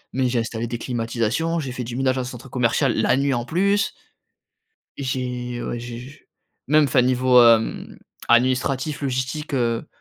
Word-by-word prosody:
mais 130 -1 +1
j'ai 120 -1 0
installé 115 0 -3
des 120 +1 -4
climatisations, 120 +7 -1
j'ai 135 -4 -4
fait 125 0 -5
du 120 0 -6
ménage 130 0 +1
en - - -1
centre 125 +1 -8
commercial 125 +1 +1
la 125 - +2
nuit, 140 0 +1
en 120 -1 -2
plus. 200 +6 +1 1.0
J'ai, 125 -2 -3
heu, - - -5
ouais 120 - -3
j'ai 120 0 -7
j 125 +2 -9
j 145 - -17 0.5
même, 150 +2 +4
enfin, 130 -2 +3
niveau, 125 0 +4
hem, 115 -1 +2 0.3
administratif, 130 +4 +1
logistique, 135 +3 -3
heu, 115 -3 0
125 Hz, 175 wpm, -22 LUFS, 120-135 Hz, 1.0 s, même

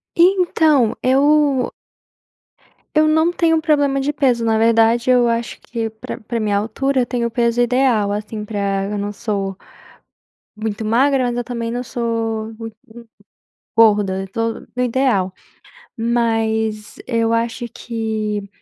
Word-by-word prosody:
Então 335 - +3
eu 280 0 +3 1.2
eu 310 0 +5
não 315 +2 +3
tenho 325 -2 +2
problema 285 -3 +2
de 290 +2 0
peso, 255 -5 +1
na 225 -1 +2
verdade, 230 +2 +3
eu 245 -1 +4
acho 230 0 -2
que 230 -2 -4
pra 220 0 -8
pra 230 +2 -4
minha 210 -2 0
altura, 255 +6 0
eu - - 0
tenho 240 -2 -1
o - - -7
peso 235 0 +1
ideal, 240 -4 +2
assim, 210 +1 -4
pra 200 -2 -2
eu 205 +1 -3
não 205 0 -3
sou 200 -3 -3 1.0
muito 215 0 -4
magra, 260 +4 +2
mas 240 0 -1
eu 245 - -2
também 235 -2 -4
não 245 +1 -3
sou 225 -2 -3
muito 225 -1 -8 1.0
gorda, 205 -4 +4
eu 195 - -6
tô 230 +3 -2 0.2
no 250 - 0
ideal, 230 -7 +1 0.6
mas 225 -2 -1
eu 230 -2 0
acho 230 +1 -1
que 215 -3 -3
230 Hz, 140 wpm, -19 LUFS, 215-255 Hz, 1.2 s, eu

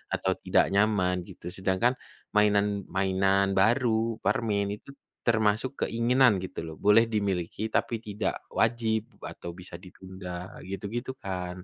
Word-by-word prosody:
atau - - 0
tidak - - +3
nyaman 95 -3 +2
gitu, - - -11
sedangkan 95 +6 +1 0.4
mainan 105 -1 +2
mainan 95 +1 +2
baru, 115 +3 +2
permen 105 -4 0
itu - - -13 0.3
termasuk 110 +3 +1
keinginan 120 -2 +3
gitu, 95 - -6
loh, 80 -1 -7
boleh 105 +3 +6
dimiliki 100 -2 -1
tapi 115 0 0
tidak 105 0 -2
wajib 110 -2 +1 0.2
atau 85 - -7
bisa 90 -1 -10
ditunda 90 0 -9
gitu-gitu, 105 +7 -4
kan. 90 -1 -5
100 Hz, 125 wpm, -28 LUFS, 95-110 Hz, 0.4 s, boleh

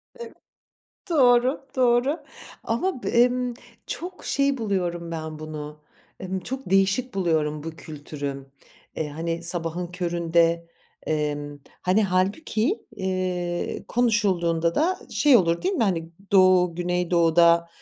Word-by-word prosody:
Evet, 475 -1 -9 0.8
doğru, 260 -2 +3
doğru. 255 +5 +2 0.4
Ama 255 +5 -1
b - - -2
emm, 245 +1 +2 0.3
çok 365 +2 -6
şey 280 -1 +1
buluyorum 175 -6 -2
ben 160 -1 -5
bunu, 150 -1 -7 0.4
emm, 190 0 -3
çok 265 +1 -6
değişik 195 +6 +2
buluyorum 155 -5 0
bu 165 - -5
kültürü. 145 -3 -7 0.5
Eee, 155 - -2
hani, 165 +3 -4
sabahın 170 0 0
köründe, 170 -1 0 0.4
emm, 145 -1 -2 0.2
hani, 190 +4 +3
hâlbuki, 215 - 0
eee, 185 -2 -2
konuşulduğunda 185 -8 +1
da 360 +5 +1
şey 290 -4 +5
olur 170 -5 +1
değil 380 +1 0
mi, 275 - +1
hani, 165 -4 -1 0.2
Doğu, 185 -3 +5
Güneydoğu'da, 170 -1 +3
180 Hz, 115 wpm, -24 LUFS, 165-240 Hz, 0.8 s, şey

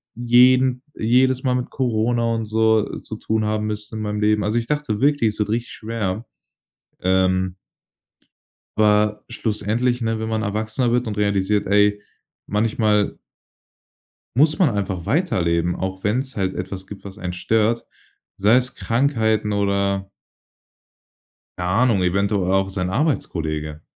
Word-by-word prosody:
jeden 125 +2 +4
jedes 130 +3 +2
Mal 130 -2 +1
mit 125 -1 -2
Corona 115 -2 0
und 115 - -2
so 110 0 +1
zu - - -8
tun 110 0 -1
haben 105 0 -1
müssen 105 +1 -5
in - - -4
meinem 105 0 -3
Leben.“ 105 0 +2
Also 105 +3 0
ich 115 -1 -1
dachte 145 -8 -2
wirklich, 140 -6 +3
es 105 - -13
wird 105 0 0
richtig 115 +2 -2
schwer, 110 -1 -4 0.8
ähm 95 0 +1 1.2
aber 105 0 +2
schlussendlich, 115 +3 -1
ne, 115 -1 -1
wenn 110 0 -3
man 110 -1 -1
erwachsener 110 +3 -1
wird 125 0 +1
und 105 -2 -4
realisiert: 100 0 +1
„Ey, 105 +1 +3 0.5
manchmal 105 -1 +1 1.2
muss 155 +3 +4
man 175 - +5
einfach 95 -4 -3
weiterleben, 90 - +1
auch 95 +1 -5
wenn's 130 +4 -1
halt 95 -1 0
etwas 95 +1 -6
gibt, 100 -1 -10
was 100 0 -10
einen 90 -3 -4
stört.“ 110 +5 0 0.5
Sei 105 +4 +4
es 125 0 0
Krankheiten 110 -4 +1
oder 100 -1 0 1.5
keine 90 0 -2
Ahnung, 115 0 +3
eventuell 100 +1 +1
auch 95 0 +2
sein 90 -2 -2
Arbeitskollege. 80 - -2
105 Hz, 140 wpm, -21 LUFS, 100-120 Hz, 1.5 s, man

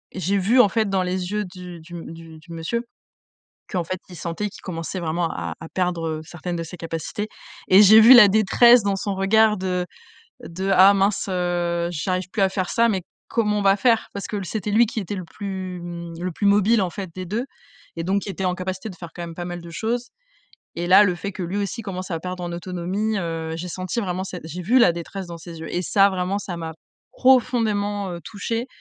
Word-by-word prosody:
j'ai 190 +2 0
vu 210 +7 +3
en 210 - +7
fait 220 0 0
dans 190 -1 +1
les 180 0 -3
yeux 210 0 -1
du 180 -1 -10
du 170 +2 -14
m 170 -2 -7
du 165 -1 -12
du 160 +2 -16
monsieur 165 +9 -3 0.9
qu'en 180 -3 -1
fait, 185 +3 -4
il 180 - -11
sentait 170 +6 -3
qu'il - - -13
commençait 175 +1 -5
vraiment 165 0 -1
à 85 - -4
à 160 - -8
perdre, 180 -2 -1
heu, 155 -1 -3
certaines 175 +2 -6
de 165 - -3
ses 165 +2 -8
capacités 165 +5 -4 0.4
et 190 +2 +8
j'ai 215 +2 +9
vu 235 +4 +9
la 225 -5 +10
détresse 225 +4 +6
dans 200 -1 +1
son 200 +1 -3
regard 210 +3 +4
de 180 -1 -1 0.6
de: 190 +3 -3
«Ah 190 +2 +8
mince, 195 +1 +1
heu, 175 -2 -1
j'arrive 185 +3 -2
plus 205 - -1
à 190 - +5
faire 185 -2 -2
ça, 235 0 +3
mais 190 -3 -1 0.3
comment 210 -3 +1
on - - -1
va 195 0 +4
faire?». 230 0 +2
Parce 200 - -4
que 205 -2 -4
c'était 210 +2 -4
lui 230 +3 +6
qui 225 0 -4
était 200 0 -5
le 185 - -5
plus 185 0 -6
mmh, 170 -1 -7
le 185 - -1
plus 205 - -5
mobile 205 +2 +4
en 180 - -1
fait 195 +1 -6
des 185 - -5
2 220 +8 -2 0.5
et 165 - -3
donc 195 +3 0
il - - -3
était 190 +1 -4
en 180 - +1
capacité 185 +3 -5
de 185 - -11
faire 170 -2 -9
quand 175 - -6
même 170 -1 -7
pas 175 - -4
mal 175 0 -5
de 170 - -10
choses 235 +7 -3 0.7
et 170 +1 -2
là, 190 +3 +8
le 185 -3 +1
fait 200 +3 -5
que 190 - -6
lui 180 +3 -3
aussi 205 +3 -3
commençait 185 -2 -5
à 165 - -4
perdre 180 +1 -5
en 175 0 -4
autonomie, 185 +5 -2
heu, 165 -2 -3
j'ai 175 +2 -5
senti 185 +6 -3
vraiment 185 -2 -3
cette 185 -2 -7
j'ai 165 +3 -6
vu 235 +9 +4
la 205 -8 +6
détresse 175 +3 -6
dans 170 -1 -7
ses 165 0 -10
yeux 160 - -7
et 175 - +1
ça, 195 +3 +4
vraiment, 190 +1 -1
ça 195 -3 -6
m'a 165 -1 -5 0.4
profondément, 210 -6 +2
heu, 170 -1 -6
touchée 230 +3 -3
185 Hz, 235 wpm, -23 LUFS, 175-205 Hz, 0.9 s, la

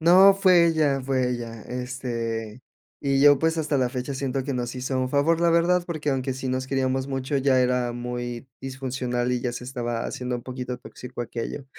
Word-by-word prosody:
No, 185 +4 +7
fue 185 -3 +5
ella 155 -4 +2
fue 130 -1 0
ella, 115 -2 -5
este, 120 -3 -4 0.4
y 135 -1 +1
yo 145 0 +7
pues, 160 +2 +1
hasta 150 -2 0
la 125 -1 +2
fecha 125 +2 -4
sien 135 -1 -2
to 135 - 0
que 140 +2 -3
nos 125 -1 -3
hizo 130 +1 -2
un 130 - 0
favor, 150 +5 +2
la 170 - +4
verdad, 175 +1 +3
porque, 155 -4 -2
aunque 130 0 -1
sí 130 0 -4
nos 130 0 -1
queríamos 130 0 0
mucho, 135 +1 -2
ella 135 -1 +3
era 125 -1 +1
muy, 120 +1 -5
disfuncional 130 -2 -2
y 125 -1 0
ya 120 -1 -2
se 125 - -6
estaba 120 -2 -3
haciendo 125 -1 -3
un 120 - -8
poquito 125 0 -5
tóxico 125 0 -8
aquello. 120 +4 -5
130 Hz, 205 wpm, -25 LUFS, 125-140 Hz, 0.4 s, No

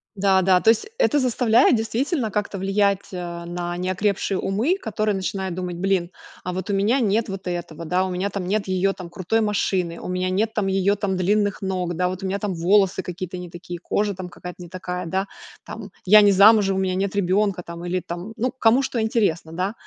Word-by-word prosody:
Да-да, 190 -2 +3
то 220 - +4
есть 225 - +3
это 295 - +3
заставляет 245 -2 +4
действительно 235 +4 -1
как-то 205 -1 -3
влиять, 195 0 0
э, 170 -1 -6
на 175 0 -4
неокрепшие 190 +1 -1
умы, 230 - 0
которые 215 - -1
начинают 190 -1 -3
думать: 180 -1 -4
"Блин, 185 -1 0 0.3
а 180 - -3
вот 185 +2 -5
у - - +1
меня 210 +7 +2
нет 220 0 +1
вот 195 -1 -6
этого, 170 -2 -5
да, 180 +3 +1
у 185 - -3
меня 185 +3 -1
там 195 -2 -4
нет 200 +2 -1
её 190 +1 +1
там 180 -3 -9
крутой 185 +6 -1
машины, 190 -5 0
у - - -7
меня 185 0 -1
нет 215 +4 0
там 210 -3 0
её 195 +1 +2
там 195 -2 -2
длинных 205 +2 +1
ног, 180 -3 -2
да, 180 +1 +1
вот 185 +1 -5
у 190 - -3
меня 195 +1 -1
там 200 -2 -3
волосы 190 +3 +2
какие-то 180 0 -6
не 180 -1 -8
такие, 175 0 -8
кожа 205 +3 -1
там 185 -1 -7
какая-то 180 +1 -10
не 175 - -9
такая, 180 -1 -5
да, 190 +3 -1 0.4
там - - -8 0.2
я 210 +3 +8
не 205 -1 +6
замужем, 200 0 +6
у - - +1
меня 190 -1 0
нет 195 +1 -1
ребенка", 195 -1 +1
там, 170 0 -8
или 180 +1 -1
там 175 +6 -7
ну 250 +3 0
кому 250 +1 +3
что 240 -3 -2
интересно, 205 -8 0
да. 185 +5 -2
190 Hz, 215 wpm, -23 LUFS, 180-210 Hz, 0.4 s, я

